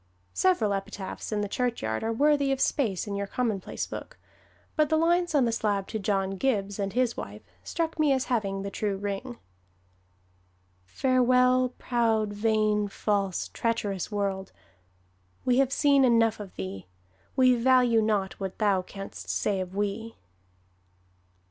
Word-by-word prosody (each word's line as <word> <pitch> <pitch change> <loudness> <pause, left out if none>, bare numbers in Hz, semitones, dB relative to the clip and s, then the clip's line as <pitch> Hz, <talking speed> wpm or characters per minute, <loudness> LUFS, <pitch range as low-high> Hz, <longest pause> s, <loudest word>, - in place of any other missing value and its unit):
Several 350 - +2
epitaphs 195 +1 -5
in 210 -1 0
the 205 - -1
churchyard 230 - -2
are 225 - 0
worthy 285 +3 +3
of 270 - 0
space 220 -12 0
in 205 -2 -4
your 200 0 -2
commonplace 215 -5 -2
book, - - -8 0.6
but 305 -2 +2
the 315 - +3
lines 345 +1 +2
on 270 -4 +4
the 230 - +1
slab 205 -3 0
to 220 - -3
John 195 -1 0
Gibbs 205 -5 -1
and 195 -1 -1 0.2
wife 105 +1 -7 0.2
struck 325 - -3
me 300 -2 +4
as 265 -1 +1
having 195 -5 -1
the 200 - -5
true 200 -1 -2
ring: 205 +5 -4 1.5
"Farewell, 255 - +3
proud, 225 -4 0
vain, 215 -1 +1
false, 200 -2 -1
treacherous 215 -5 -2
world, 195 -2 -2 0.9
We 250 0 +3
have 270 -1 +3
seen 280 -1 +4
enough 230 -3 +3
of 200 -3 -9
thee: 95 0 -6 0.5
We 255 -2 +5
value 245 -2 +4
not 210 -3 0
what 190 -1 -5
thou 200 -3 +2
canst 195 +2 -9
say 200 -2 0
of 185 0 -5
we." 205 +3 -3
215 Hz, 145 wpm, -27 LUFS, 195-255 Hz, 1.5 s, We